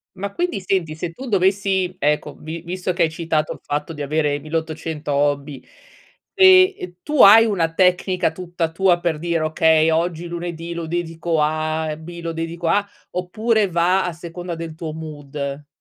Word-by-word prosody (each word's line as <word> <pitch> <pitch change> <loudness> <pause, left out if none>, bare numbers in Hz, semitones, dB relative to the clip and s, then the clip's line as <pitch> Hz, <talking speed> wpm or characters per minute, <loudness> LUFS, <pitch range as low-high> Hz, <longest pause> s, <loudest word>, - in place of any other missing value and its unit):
Ma 200 +1 -4
quindi 350 - -1
senti, 175 -4 -1
se 170 +1 -4
tu 260 +9 -9
dovessi 190 -2 +1
ecco, 150 +1 0
vi 160 +1 -6
visto 180 +1 -3
che 175 - +2
hai 160 - +2
citato 160 -2 -1
il - - -14
fatto 150 +3 -3
di 150 - -7
avere 145 0 0
1800 160 -1 -4
hobby, 140 -1 -1 0.7
ehm 375 0 +7
ehm, 180 -1 -7
tu 300 -2 +2
hai 220 +3 +9
una 175 -7 0
tecnica 180 -1 +2
tutta 175 -1 -3
tua 175 0 +3
per 165 -3 -1
dire: 170 -1 -1
"Okay, 160 0 +3
oggi 170 +1 -1
lunedì 170 0 -5
lo 170 -1 -5
dedico 165 -1 -2
a 155 +1 0
A 155 - -2
e 150 - -5
B 170 +2 -9
lo 165 - -2
dedico 165 +1 -4
a" 200 +4 +2 0.2
oppure 215 +4 0
va 180 +3 +2
a 175 - -3
seconda 170 +1 -7
del 165 -1 -6
tuo 160 -1 -6
mood? 145 -2 -6
170 Hz, 180 wpm, -21 LUFS, 155-180 Hz, 0.7 s, hai